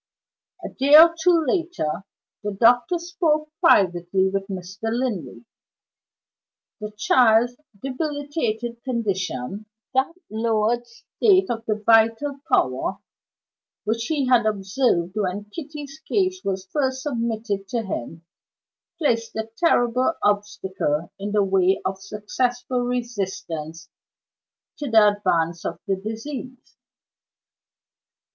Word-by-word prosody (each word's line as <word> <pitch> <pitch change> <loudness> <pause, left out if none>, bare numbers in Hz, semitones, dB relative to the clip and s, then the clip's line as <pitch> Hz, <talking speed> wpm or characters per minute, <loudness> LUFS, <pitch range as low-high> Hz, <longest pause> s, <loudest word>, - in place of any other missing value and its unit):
A - - -4
day 280 +3 +4
or 330 +2 +9
two 335 -2 +4
later, 330 - -1 0.4
the 210 0 -2
doctor 245 +9 +4
spoke 330 -3 -1
privately 190 - +3
with 195 0 -2
Mr. 190 +3 -5
Linley. 190 - -3 1.3
The 210 - -5
child's 240 +2 +4 0.3
debilitated 270 -5 -3
condition 200 - -3 0.3
that 265 +5 +2 0.2
lowered 225 +2 0
state 375 - +1
of 225 -1 -3
the 215 - +1
vital 230 +5 +3
power 130 - +1 0.9
which 225 +2 -1
he 295 -4 0
had 240 -3 +4
observed 195 -3 0
when 205 0 -3
Kitty's 295 -1 -8
case 370 +2 0
was 190 -1 -2
first 265 -3 0
submitted 230 -7 -2
to 230 +3 -2
him 165 - -6 0.7
placed 230 -7 0
a 220 0 -4
terrible 255 -3 +2
obstacle 190 -6 -1
in 205 +1 -4
the 210 -1 +3
way 190 -1 +2
of 190 0 -3
successful 245 +5 -2
resistance 190 -10 -4 0.9
to 290 -2 -4
the 220 -2 +6
advance 175 -5 0
of 170 - -3
the 195 -2 0
disease. 245 +5 -7
225 Hz, 110 wpm, -23 LUFS, 195-260 Hz, 1.3 s, or